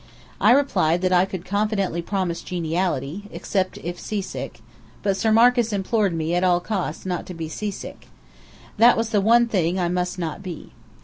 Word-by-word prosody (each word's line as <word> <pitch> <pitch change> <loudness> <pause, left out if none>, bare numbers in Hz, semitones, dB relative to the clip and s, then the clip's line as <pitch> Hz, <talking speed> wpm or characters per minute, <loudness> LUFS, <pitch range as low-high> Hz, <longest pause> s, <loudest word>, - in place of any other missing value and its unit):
I - - +4
replied 185 - +3
that 185 - +2
I 180 +1 +5
could 185 -2 -7
confidently 200 -4 0
promise 180 -2 -2
geniality, 175 +1 -2
except 185 -2 -2
if 175 +1 -5
seasick: 205 -3 -5 0.4
but 195 -1 +1
Sir 220 +3 +1
Marcus 235 +1 +4
implored 200 -2 0
me 160 +1 -1
at 175 +1 +1
all 180 -1 +4
costs 180 -4 -3
not 180 -2 -3
to 180 - -7
be 165 -1 -5
seasick. 205 +5 -6 0.7
That 235 +3 +6
was 225 0 0
the 210 -3 +2
one 235 +4 +5
thing 185 -5 0
I 175 -1 +1
must 180 +1 -1
not 165 0 -4
be. 180 -5 -8
185 Hz, 175 wpm, -23 LUFS, 175-210 Hz, 0.7 s, That